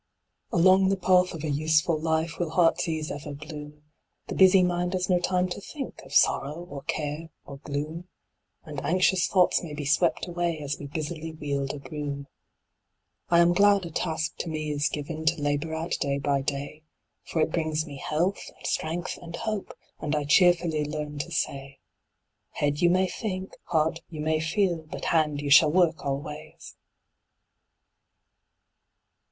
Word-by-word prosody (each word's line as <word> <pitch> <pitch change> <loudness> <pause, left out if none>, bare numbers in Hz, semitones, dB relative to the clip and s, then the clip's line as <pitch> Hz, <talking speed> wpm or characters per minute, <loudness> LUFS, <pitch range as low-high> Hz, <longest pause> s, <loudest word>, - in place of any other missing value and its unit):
Along 185 +2 +5
the 195 - +1
path 185 -1 +4
of 160 - -7
a 155 - -2
useful 155 +3 +2
life 160 +1 -1
Will 175 -2 -1
heart's 165 +1 +3
ease 155 -1 -2
ever 145 0 -6
bloom; 150 0 -9 0.5
The - - -2
busy 190 0 +6
mind 180 0 0
has 185 0 0
no 180 - +4
time 180 0 +1
to 180 - -5
think 275 +6 -7
Of - - -15
sorrow, 145 +2 +3 0.2
or 140 -1 -6
care, 155 +1 -3 0.2
or 140 - -9
gloom; 155 +5 -5 0.6
And 150 -4 -6
anxious 185 +1 +3
thoughts 185 -2 +3
may 155 -4 -7
be 145 -1 -5
swept 160 +4 +2
away 175 -1 -1
As 145 -1 -4
we 145 - -6
busily 160 +2 -5
wield 140 -3 -2
a - - -6
broom. 145 -1 -5 1.0
I 170 0 +6
am 170 0 +5
glad 200 0 +4
a 170 - -7
task 160 0 -2
to 170 - -4
me 155 -1 -3
is 145 +1 +1
given 155 +2 -5
To 165 +1 +2
labor 145 +2 -1
at 165 +2 -4
day 140 0 0
by 140 0 0
day; 140 +2 -4 0.4
For 165 - -3
it 155 - +2
brings 155 -2 -1
me 145 -3 -9
health, 170 +8 -1
and - - -14
strength, 165 +2 -2
and 170 -1 -7
hope, 215 -3 -3 0.3
And 150 0 -1
I 150 - 0
cheerfully 170 0 +4
learn 150 0 -4
to 170 +4 -4
say 135 -3 -3 0.8
'Head, 145 0 0
you 175 - +5
may 185 +2 +3
think; 190 -1 -5
heart, 160 0 +1
you 155 -3 -6
may 155 0 +1
feel; 175 +2 +1
But 155 - -8
hand, 150 -3 +2
you 145 -1 -3
shall 150 +2 +8
work 170 -2 +2
always!' 140 0 -6
160 Hz, 170 wpm, -27 LUFS, 150-175 Hz, 1.0 s, shall